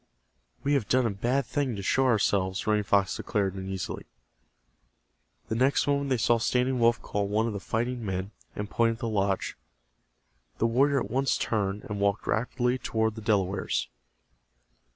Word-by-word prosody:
"We 145 - +1
have 130 -8 +1
done 130 0 +3
a 115 - +1
bad 120 +7 0
thing 130 -1 -1
to 100 - -5
show 130 +6 +2
ourselves," 100 -5 +1
Running 105 -1 +2
Fox 100 -1 +2
declared, 100 -4 -1
uneasily. 95 -1 -5 1.4
The - - -2
next 130 +5 +2
moment 140 -1 0
they 130 - +2
saw 120 +1 +3
Standing 125 +2 +1
Wolf 115 0 +4
call 100 -1 -1
one 105 +2 +1
of 115 - -2
the 100 - -4
fighting 120 +4 -2
men, 95 0 -3 0.2
and 105 - -3
point 115 +2 +2
at - - -9
the 115 0 -3
lodge. 100 -3 0 1.0
The - - +1
warrior 135 +4 +3
at - - -5
once 135 +1 +1
turned 100 -2 -1
and 105 -1 -5
walked 100 0 +1
rapidly 125 +2 0
toward 110 -2 0
the 110 - -8
Delawares. 95 - 0
110 Hz, 170 wpm, -28 LUFS, 100-125 Hz, 1.4 s, Wolf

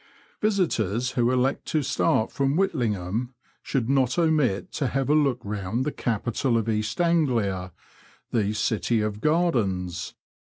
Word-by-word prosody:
Visitors 130 - +1
who 120 -2 +1
elect 130 +1 0
to 155 -2 0
start 125 -4 +1
from 140 +1 0
Whitlingham 120 - -1 0.3
shouid 125 -5 -1
not 130 -2 +2
omit 155 - +1
to 140 - -1
have 135 +2 0
a - - +5
look 140 -5 +2
round 105 +4 -2
the 150 - 0
capital 120 +1 -1
of 115 -1 -1
East 110 0 -1
AngUa, 120 - +1 0.6
the 105 -3 +1
city 110 +1 0
of 105 0 -3
gardens. 100 - 0
120 Hz, 135 wpm, -25 LUFS, 105-140 Hz, 0.6 s, a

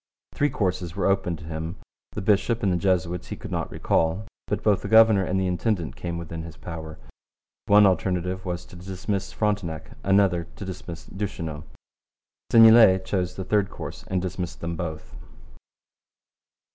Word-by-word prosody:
Three 145 - +1
courses 90 - -2
were 100 - -1
open 95 -3 +1
to 80 - -12
him. 80 +2 -5 0.4
The - - -4
bishop 110 +4 +2
and 95 -3 +2
the - - +1
Jesuits 90 -1 0
he - - -5
could - - -9
not - - -2
recall. 80 +6 0 0.2
But - - -2
both 105 -3 +3
the - - -5
governor 110 -2 +6
and 95 +1 0
the 95 - 0
intendant 90 -1 -1
came 85 -1 -4
within 80 -1 -6
his 80 0 -10
power. 80 -2 -7 0.7
One 105 0 +7
alternative 95 -1 0
was 90 -2 -4
to - - -14
dismiss 95 +2 -4
Frontenac; 100 -7 -2
another, 95 -3 +3
to 100 - -7
dismiss 85 -2 -7
Duchesneau. 85 -6 -5 0.9
Seignelay 115 -4 +8
chose 90 -2 -1
the 95 - -4
third 105 -2 +1
course - - -8
and 95 -1 -1
dismissed 90 -1 -4
them 85 0 -4
both. 80 -7 -6
90 Hz, 160 wpm, -25 LUFS, 85-100 Hz, 0.9 s, Seignelay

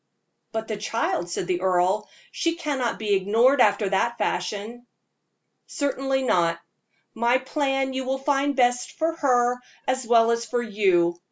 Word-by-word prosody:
"But 220 0 -4
the 215 - -3
child," 205 -4 -2
said 175 - -3
the 180 0 -1
earl 185 +2 +1 0.2
"she 335 -1 -1
cannot 285 -8 -2
be 210 -2 -1
ignored 225 +8 +3
after 205 -1 +3
that 235 +5 0
fashion." 210 +7 -3 0.8
"Certainly 270 -2 -1
not. 170 -8 +1 0.5
My 235 +2 +2
plan 270 0 -1
you 265 0 -2
will 265 +1 -1
find 280 +1 0
best 245 -1 +1
for 325 0 -1
her 245 -4 +2 0.3
as 260 -2 -1
well 230 -1 +5
as 235 0 0
for 240 +1 -2
you. 185 -6 +1
235 Hz, 150 wpm, -24 LUFS, 205-265 Hz, 0.8 s, well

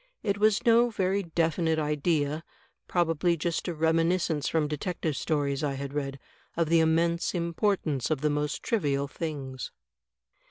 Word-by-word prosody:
It 200 -1 0
was 215 +3 +3
no 235 +1 +5
very 195 -2 0
definite 165 -1 0
idea, 150 0 0 0.4
probably 170 0 +1
just 165 +3 -2
a 175 - -1
reminiscence 165 -1 +1
from 160 -2 +1
detective 155 0 -2
stories 145 -2 -1
I 145 -2 0
had 140 0 -5
read, 140 -2 -3 0.4
of 165 -2 +1
the 165 0 +5
immense 170 +2 +2
importance 170 - 0
of 155 -4 0
the 150 0 +2
most 150 0 -2
trivial 145 - 0
things." 140 -4 -5
160 Hz, 145 wpm, -28 LUFS, 150-175 Hz, 0.4 s, no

